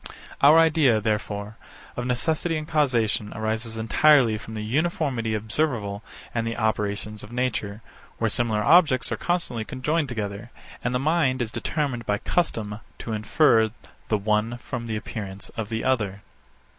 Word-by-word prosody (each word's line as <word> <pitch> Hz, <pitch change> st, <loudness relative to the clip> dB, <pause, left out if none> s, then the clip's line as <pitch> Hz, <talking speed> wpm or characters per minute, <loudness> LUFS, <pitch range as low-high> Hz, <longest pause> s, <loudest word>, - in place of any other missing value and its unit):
Our 150 Hz, +3 st, +8 dB
idea, 155 Hz, -8 st, +4 dB
therefore, 105 Hz, 0 st, -2 dB, 0.4 s
of 125 Hz, 0 st, -3 dB
necessity 160 Hz, +6 st, 0 dB
and 155 Hz, 0 st, -5 dB
causation 120 Hz, -9 st, +1 dB
arises 110 Hz, +1 st, -2 dB
entirely 120 Hz, +1 st, +4 dB
from 110 Hz, +1 st, -9 dB
the 105 Hz, -, -4 dB
uniformity 130 Hz, -3 st, 0 dB
observable 110 Hz, -2 st, -1 dB, 0.3 s
in 115 Hz, -, 0 dB
the 115 Hz, 0 st, -3 dB
operations 105 Hz, -1 st, -1 dB
of 105 Hz, -, -11 dB
nature, 115 Hz, -4 st, -2 dB, 0.3 s
where 115 Hz, -, +1 dB
similar 110 Hz, -1 st, +1 dB
objects 155 Hz, -3 st, +4 dB
are -, -, +1 dB
constantly 170 Hz, -10 st, -1 dB
conjoined 145 Hz, +5 st, -1 dB
together, 105 Hz, -1 st, -4 dB, 0.3 s
and 125 Hz, +1 st, 0 dB
the -, -, +2 dB
mind 145 Hz, -3 st, +2 dB
is 115 Hz, -3 st, -2 dB
determined 130 Hz, -7 st, -2 dB
by 105 Hz, -, +1 dB
custom 110 Hz, -9 st, -1 dB, 0.2 s
to 115 Hz, -, -5 dB
infer 110 Hz, +1 st, +3 dB, 0.4 s
the 110 Hz, -, +2 dB
one 105 Hz, +3 st, 0 dB
from 120 Hz, -1 st, -6 dB
the 110 Hz, -, -2 dB
appearance 100 Hz, -3 st, -6 dB
of 110 Hz, -2 st, -5 dB
the 110 Hz, 0 st, -2 dB
other. 105 Hz, -6 st, 0 dB
115 Hz, 150 wpm, -25 LUFS, 105-135 Hz, 0.4 s, Our